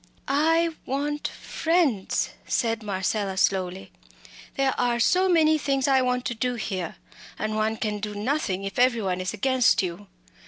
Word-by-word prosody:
"I 325 +4 +3 0.2
want 295 +2 -2
friends!" 320 - 0 0.2
said 230 -1 0
Marcella, 195 -1 -2
slowly. 190 -1 0 0.6
"There 270 -1 +1
are 240 -1 +1
so 370 +10 +3
many 315 -3 +4
things 275 -2 0
I 265 -1 +4
want 250 0 0
to - - -1
do 245 +2 -1
here, 190 -7 -4 0.4
and 215 0 -2
one 215 +1 0
can 210 -1 -2
do 210 0 -5
nothing 205 -4 -1
if 195 +3 -4
every 245 -3 +3
one 185 -1 -1
is 185 0 -2
against 255 0 +2
you. 185 +3 -5
235 Hz, 155 wpm, -25 LUFS, 200-275 Hz, 0.6 s, many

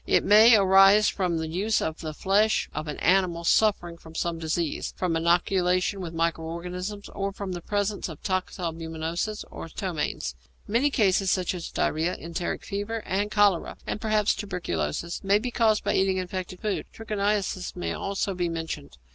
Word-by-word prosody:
It - - +3
may 220 +3 +8
arise 195 +1 +6
from 180 -4 -1
the 160 0 -2
use 195 +7 0
of 160 0 -3
the 155 - -4
flesh 210 +5 +2
of 155 +1 -4
an 150 - -4
animal 180 -2 +2
suffering 175 -3 +2
from 160 -1 -14
some 170 0 -2
disease, 160 -1 -2
from 180 -3 0
inoculation 180 +3 +2
with 170 -3 -5
micro 165 0 -1
organisms, 180 +5 -5
or 195 0 -3
from 195 -1 -6
the 175 -1 -5
presence 205 +1 -2
of 155 - -9
toxalbumoses 170 0 -3
or - - -7
ptomaines. 160 - -3 0.3
Many 235 +7 +2
diseases, 195 -6 +2
such 185 -1 +1
as 175 -2 -5
diarrhoea, 165 +3 0
enteric 170 +1 -4
fever, 210 +3 -3
and 200 +3 -1
cholera, 205 -4 +2
and 210 - -4
perhaps 215 -2 +2
tuberculosis, 170 - -3
may 195 +1 +4
be 245 +4 -3
caused 220 -3 +2
by - - 0
eating 190 0 +2
infected 185 0 -5
food. 210 -2 -2
Trichiniasis 205 -4 -2
may 175 - -3
also 195 0 -2
be 175 -1 -1
mentioned. 160 - -5
185 Hz, 165 wpm, -26 LUFS, 170-205 Hz, 0.3 s, may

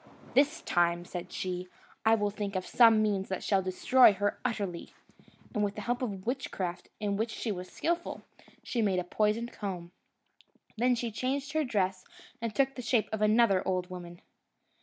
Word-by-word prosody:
"This 290 +4 +3
time," 175 0 +1
said 180 0 -6
she, 180 -1 -3 0.4
"I 225 0 +5
will 205 -2 0
think 205 -1 -4
of 185 - -1
some 225 -3 +6
means 200 -2 0
that 190 - -3
shall 195 -2 +2
destroy 200 +6 +5
her 205 +1 -1
utterly;" 200 -8 -3 0.6
and 210 - +1
with 205 0 -1
the 210 - -5
help 245 +3 -1
of 200 -6 -4
witchcraft, 190 -9 -3
in 205 -2 -1
which 220 +2 0
she 220 +1 -3
was 180 -2 -5
skilful, 340 +1 -2 0.4
she 240 - -1
made 195 -4 +2
a 180 - 0
poisoned 215 +5 0
comb. 180 -4 -5 0.8
Then 245 +2 +3
she 235 -1 -3
changed 275 +5 -2
her 315 0 +2
dress 190 -7 0 0.4
and 230 -2 -3
took 270 -1 +2
the 250 - -6
shape 230 -1 +1
of 215 - -2
another 215 -3 +4
old 185 -1 -1
woman. 175 -1 -8
210 Hz, 180 wpm, -30 LUFS, 185-235 Hz, 0.8 s, some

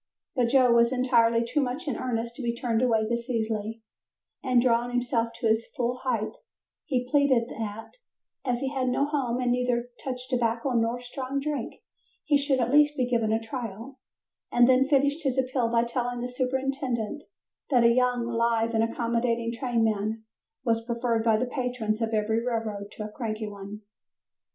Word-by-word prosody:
But 250 -2 +3
Joe 255 0 +4
was 235 0 +4
entirely 235 -3 +3
too 250 +5 0
much 255 +2 -3
in 275 - -1
earnest 235 -1 -3
to - - -7
be 235 -1 -1
turned 235 -1 0
away 225 -3 +2
this 235 +2 -3
easily, 220 -1 -2 0.6
and 255 -2 +3
drawing 240 0 +2
himself 245 -1 0
to 235 0 -1
his 220 +1 +1
full 245 0 0
height, 245 -5 -1 0.5
he 250 -5 -1
pleaded 260 -4 +3
that, 220 -1 -6 0.5
as 245 -2 -1
he 270 - -1
had 260 -2 0
no 275 +3 +2
home 265 -5 -1
and 250 -1 +1
neither 245 -1 0
touched 255 0 -5
tobacco 240 +1 0
nor 230 0 +1
strong 260 +2 -4
drink, 295 +1 -4 0.4
he 300 - +3
should 280 -2 +2
at 240 0 +1
least 295 0 +5
be 250 -2 +1
given 230 -3 +2
a 220 - +2
trial, 230 +2 -7 0.5
and 240 0 +5
then 260 +1 +4
finished 285 +2 +2
his 270 -4 -1
appeal 255 -2 +1
by 230 0 +3
telling 245 0 -2
the 245 - -3
superintendent 260 -1 -2 0.5
that 250 -5 +4
a 235 - +7
young, 250 -1 +2
live 230 -1 +1
and 225 0 +3
accommodating 230 0 0
trainman 225 -3 0 0.4
was 225 -1 +1
preferred 235 -1 0
by 225 -1 +4
the 245 - 0
patrons 245 -4 -2
of 225 0 0
every 220 +1 +1
railroad 220 -4 -3
to 210 - -7
a 210 - -7
cranky 220 -2 -4
one. 205 0 -8
240 Hz, 175 wpm, -27 LUFS, 230-255 Hz, 0.6 s, a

